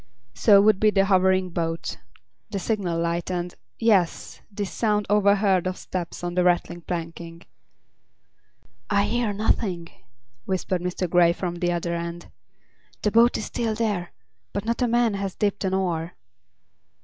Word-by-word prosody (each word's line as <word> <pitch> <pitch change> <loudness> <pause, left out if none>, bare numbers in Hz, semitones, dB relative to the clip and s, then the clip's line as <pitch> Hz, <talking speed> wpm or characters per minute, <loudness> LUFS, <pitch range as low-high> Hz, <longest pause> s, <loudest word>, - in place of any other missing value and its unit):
So 205 -3 +6
would 210 -2 +4
be 215 - +5
the 195 -2 +3
hovering 190 -1 +2
boat—the 165 - -6
signal 190 -4 -1
light 170 +1 -1
and—yes! 180 +2 -1
this 200 -2 -4
sound 210 -2 0
overheard 200 -3 +3
of 185 - -3
steps 175 -1 -5
on 175 0 -3
a - - +4
rattling 175 -1 +1
planking. 165 0 -6 1.5
"I 200 +5 +3
hear 230 +1 0
nothing," 195 -4 -1 0.6
whispered 185 -1 -1
Mr. 180 +1 -2
Grey 170 0 +4
from 175 -1 -4
the 175 0 0
other 170 0 -2
end. 170 0 -5 0.7
"The 210 - +2
boat 235 +2 +5
is - - -4
still 225 -2 -2
there, 210 -6 -2 0.4
but 200 +1 -3
not 235 +2 -1
a 245 - +3
man 235 -1 +2
has 195 -1 -3
dipped 205 -1 -1
an 190 0 0
oar." 175 -3 -2
185 Hz, 145 wpm, -24 LUFS, 175-210 Hz, 1.5 s, So